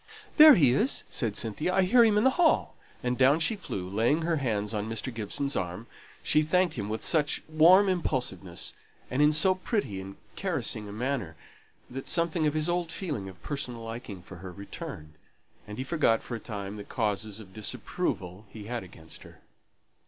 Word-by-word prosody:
"There 305 -2 +10
he 140 - +5
is!" 220 - +1
said 110 -5 -1
Cynthia. 150 - -1
"I 190 - +4
hear 235 +6 +5
him 215 -2 +4
in 210 - +3
the 265 - +5
hall!" 325 +3 +2 0.3
And 125 0 -1
down 135 +4 +5
she 165 +7 +3
flew, 100 - -5
and 100 - -8
laying 120 +9 +2
her 165 0 +1
hands 110 -6 -1
on 105 0 -3
Mr. 115 +3 -4
Gibson's 140 +6 -2
arm, 90 +5 -3 0.4
she 155 - +3
thanked 175 +2 +2
him 105 -4 -4
with 110 +1 -3
such 150 -3 +1
warm 170 +6 +6
impulsiveness, 125 - -2 0.4
and 130 +3 +1
in 150 0 +6
so 155 +5 +4
pretty 185 - -3
and 95 +1 -9 0.2
caressing 105 -1 -2
a - - -7
manner, 115 - -3 0.5
that 135 +2 -7
something 170 -2 +1
of 150 - -1
his 155 +1 +1
old 175 -1 -1
feeling 145 - -4
of 95 - -15
personal 125 -5 -4
liking 115 -5 -7
for 95 0 -11
her 90 +1 -8
returned, 80 -5 -9 0.5
and 105 0 -8
he 130 - -2
forgot 135 -6 +1
for - - -7
a - - -5
time 105 -2 -6
the 105 - -7
causes 105 -1 -2
of 95 -4 -13
disapproval 100 -2 -3
he 110 - -10
had 120 +3 -4
against 80 -3 -11
her. - - -15
125 Hz, 190 wpm, -28 LUFS, 105-160 Hz, 0.5 s, There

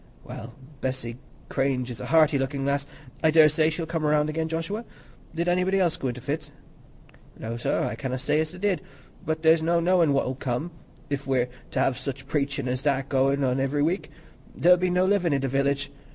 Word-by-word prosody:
"Well, 115 +2 -9 0.3
Bessy 130 -3 -3 0.3
Cranage 130 -2 -1
is 115 - -7
a - - -5
hearty 155 -3 +4
looking 135 +1 -2
lass; 140 0 0 0.4
I 160 - +5
daresay 155 0 +5
she'll 160 +1 -3
come 165 -1 -3
round 150 0 +2
again, 160 +1 -1
Joshua. 165 +8 -3 0.5
Did 170 +1 -1
anybody 185 +2 +2
else 175 -3 +2
go 135 - -3
into 125 0 -4
fits?" 145 +3 -3 0.9
"No, 115 +1 -5
sir, 120 - 0
I - - -2
canna 130 +3 -3
say 150 +3 +1
as 155 0 -1
they 180 - -10
did. 195 -1 0 0.4
But 160 +1 -2
there's 160 0 +5
no 170 +1 +2
knowin' 170 -2 +3
what'll 135 -2 +1
come, 130 +5 -3 0.4
if 140 -1 -2
we're 125 -2 +1 0.2
t' - - -2
have 130 -1 +1
such 130 0 -5
preachin's 140 -3 -1
as 125 0 -1
that 135 -2 +1
a - - -24
goin' 135 +1 +2
on 130 0 +1
ivery 145 +2 +1
week—there'll 180 +1 0
be 180 +1 0
no 180 +1 +2
livin' 185 -6 +2
i' - - +3
th' 135 - -2
village. 140 +1 0
145 Hz, 200 wpm, -26 LUFS, 135-165 Hz, 0.9 s, I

